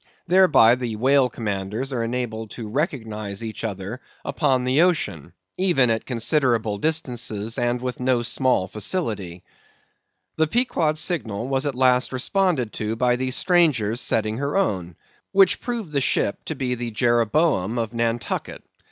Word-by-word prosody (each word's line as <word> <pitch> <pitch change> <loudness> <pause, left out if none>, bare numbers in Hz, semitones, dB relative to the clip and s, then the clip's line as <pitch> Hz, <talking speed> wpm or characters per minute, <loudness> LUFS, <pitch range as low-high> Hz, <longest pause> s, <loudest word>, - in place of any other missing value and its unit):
Thereby, 175 -11 +6
the 120 -3 -2
whale 130 +3 +3
commanders 105 +4 -4
are 120 -2 -1
enabled 115 -2 -3
to 115 -3 -6
recognise 110 - -3
each 110 0 -6
other 105 +2 -5 0.2
upon 135 -5 +1
the 130 +5 +3
ocean, 165 - 0 0.3
even 165 -11 +3
at 110 - -2
considerable 120 -4 +1
distances 120 -8 -2
and 120 0 0
with 125 0 -4
no 125 -1 +1
small 125 -5 +1
facility. 105 - -3 0.9
The 160 0 +3
Pequod's 160 -7 +1
signal 120 - -1
was 135 +2 0
at 140 - -2
last 125 0 +3
responded 135 - 0
to 110 +1 -1
by 125 +1 +2
the 130 +1 -2
stranger's 130 - +2
setting 110 -1 0
her 140 +6 -1
own; 95 - -1 0.4
which 195 -1 +4
proved 230 -9 -4
the 140 -2 0
ship 100 - 0
to 160 - -4
be 130 -2 -2
the 120 -1 -4
Jeroboam 120 - +1
of 115 -1 -2
Nantucket. 115 -1 -2
125 Hz, 145 wpm, -23 LUFS, 110-145 Hz, 0.9 s, Thereby